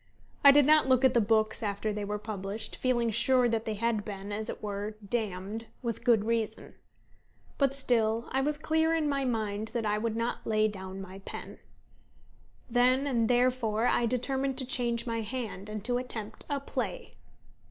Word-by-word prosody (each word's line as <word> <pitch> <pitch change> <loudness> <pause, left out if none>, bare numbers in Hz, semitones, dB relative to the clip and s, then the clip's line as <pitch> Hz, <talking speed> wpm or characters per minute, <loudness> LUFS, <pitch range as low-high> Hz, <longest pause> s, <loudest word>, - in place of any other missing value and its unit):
I 280 - +10
did 285 0 +7
not 305 -1 +5
look 260 0 +4
at 260 - +5
the 235 - +4
books 215 +1 +1
after 210 0 -2
they 210 0 -3
were 205 +1 -2
published, 210 0 -4
feeling 240 -3 +1
sure 250 +3 +4
that 225 -1 -1
they 220 - -2
had 225 0 0
been, 200 -1 -7
as 215 +1 -3
it - - -6
were, 205 +1 -4
damned 215 0 -3 0.2
with 235 -1 -3
good 230 -4 +4
reason. 225 -1 -2 0.9
But 275 -1 +2
still 230 -4 +1
I 265 - +1
was 295 +2 0
clear 320 +1 +1
in 315 -2 0
my 275 -2 0
mind 220 -3 -2
that 230 -2 -1
I 210 0 +1
would 225 0 -2
not 230 +1 -3
lay 215 -1 +3
down 190 -2 -7
my 190 0 -9
pen. 195 - -8 1.1
Then 255 +3 +3
and 235 -5 +1
therefore 245 -3 +2
I 240 -1 +2
determined 265 +2 0
to 260 - -1
change 240 -2 +1
my 230 -1 -2
hand, 215 -3 -5
and 215 -1 -6
to 245 0 +1
attempt 220 -4 -5
a 285 -1 0
play. 275 - -4
230 Hz, 185 wpm, -29 LUFS, 210-255 Hz, 1.1 s, I